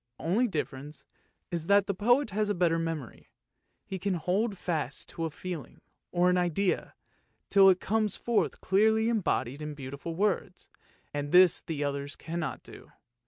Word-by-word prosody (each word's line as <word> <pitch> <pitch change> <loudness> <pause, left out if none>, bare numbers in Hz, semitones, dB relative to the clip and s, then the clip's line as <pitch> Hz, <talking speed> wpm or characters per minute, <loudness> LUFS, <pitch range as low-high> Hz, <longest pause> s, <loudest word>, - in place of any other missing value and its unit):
The - - -12
only 215 +9 +2
difference 145 - -5 0.5
is 170 -2 -3
that 200 -1 +5
the 200 - -1
poet 240 +5 +2
has 210 +1 0
a 205 - +1
better 170 -2 +2
memory, 165 -6 -5 0.6
he 190 - -5
can 195 0 -1
hold 195 +5 0
fast 165 -4 -3
to 165 - -4
a - - -2
feeling 170 0 -7 0.3
or 175 0 +3
an 180 0 +3
idea 180 +2 0 0.5
till 195 -1 +7
it 185 -1 +4
comes 215 -1 0
forth 235 -2 0
clearly 220 +3 +3
embodied 155 - -1
in 150 -1 -5
beautiful 140 +4 -6
words, 190 -1 -1 0.4
and 145 0 -3
this 180 -1 +6
the 150 -3 -4
others 140 0 -3
cannot 170 -1 -5
do. - - -13
180 Hz, 165 wpm, -29 LUFS, 155-200 Hz, 0.6 s, till